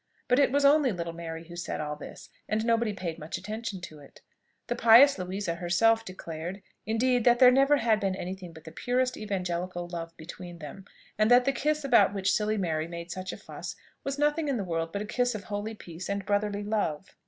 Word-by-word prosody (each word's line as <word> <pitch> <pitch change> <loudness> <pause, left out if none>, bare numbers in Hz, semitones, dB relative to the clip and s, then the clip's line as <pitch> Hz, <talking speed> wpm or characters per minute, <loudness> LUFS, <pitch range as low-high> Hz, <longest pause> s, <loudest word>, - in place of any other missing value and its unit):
But 250 - +4
it 280 - +4
was 285 +1 +2
only 285 -2 +5
little 170 -3 -4
Mary 165 -1 -7
who 170 - -10
said 170 - -4
all 150 0 -3
this, 150 - -11 0.2
and 220 +1 0
nobody 230 -1 +2
paid 180 -5 -5
much 155 +3 -5
attention 210 +1 -5
to 155 -3 -9
it. 140 - -16 0.4
The 240 - -2
pious 235 +2 +7
Louisa 185 0 -3
herself 190 +7 +2
declared, 180 -1 -7 0.2
indeed, 245 +2 +2
that 240 -1 +6
there 250 0 +8
never 275 +3 +4
had 225 -4 +2
been 195 -2 -1
any 185 0 -4
thing 180 -3 -10
but 160 -1 -14
the 160 - -10
purest 250 +7 0
evangelical 180 -3 -3
love 170 -1 -7
between 175 +2 -9
them; 165 +5 -9 0.3
and 215 +1 +4
that 245 0 +6
the 275 - +2
kiss 300 +2 0
about 205 -7 +4
which 195 0 +1
silly 215 +1 +1
Mary 160 -4 -1
made 170 0 -7
such 185 +1 -5
a - - -7
fuss, - - -8 0.3
was 275 0 -3
nothing 295 +2 +1
in 275 -3 0
the 205 - -2
world 165 -2 -2
but 200 +3 -3
a - - -6
kiss 245 +2 0
of 205 - -6
holy 210 +1 -4
peace 175 -2 -8
and 200 -1 -2
brotherly 205 0 0
love. 200 -6 -2
200 Hz, 220 wpm, -28 LUFS, 170-235 Hz, 0.4 s, there